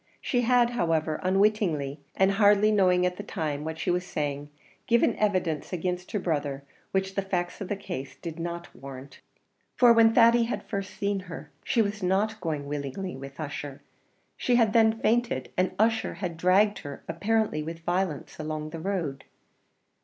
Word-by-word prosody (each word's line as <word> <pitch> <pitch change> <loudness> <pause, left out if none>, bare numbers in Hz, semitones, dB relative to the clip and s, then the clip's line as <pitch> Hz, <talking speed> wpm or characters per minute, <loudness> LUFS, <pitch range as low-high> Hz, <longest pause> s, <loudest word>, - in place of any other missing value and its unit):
She 245 - 0
had, 245 0 +3
however, 165 -8 0
unwittingly, 185 -7 +1 0.2
and 190 +1 +4
hardly 205 +1 +5
knowing 180 -3 +4
at 180 0 -1
the - - -4
time 155 -7 -3
what 160 0 -4
she 170 - -1
was 180 0 0
saying, 145 -4 -3 0.4
given 235 -1 +3
evidence 185 -7 0
against 180 0 -3
her 210 - 0
brother 145 -6 -2 0.3
which 190 0 -1
the 195 - 0
facts 180 -2 -3
of 195 - -3
the 205 - -1
case 135 -8 -6
did 170 -1 -7
not 170 +1 -5
warrant. 135 +1 -10 0.6
For 245 -2 +7
when 225 -1 +5
Thady 235 0 +6
had 235 - -3
first 195 -2 -5
seen 200 0 -1
her, 165 - -8
she 235 -4 +2
was 205 +1 -3
not 200 +4 0
going 155 -4 -2
willingly 145 +6 -4
with 135 +2 -10
Ussher; 145 -2 -6 0.5
she 245 - +1
had 225 -3 +3
then 225 -1 +4
fainted, 230 - +1
and 185 +1 0
Ussher 225 -4 +1
was 180 -3 -2
dragging 190 +5 +3
her, 140 -1 -8
apparently 200 0 0
with 165 +2 -6
violence, 175 -4 -2
along 155 0 -4
the 165 - -6
road. 165 -7 -3
180 Hz, 170 wpm, -27 LUFS, 155-210 Hz, 0.6 s, For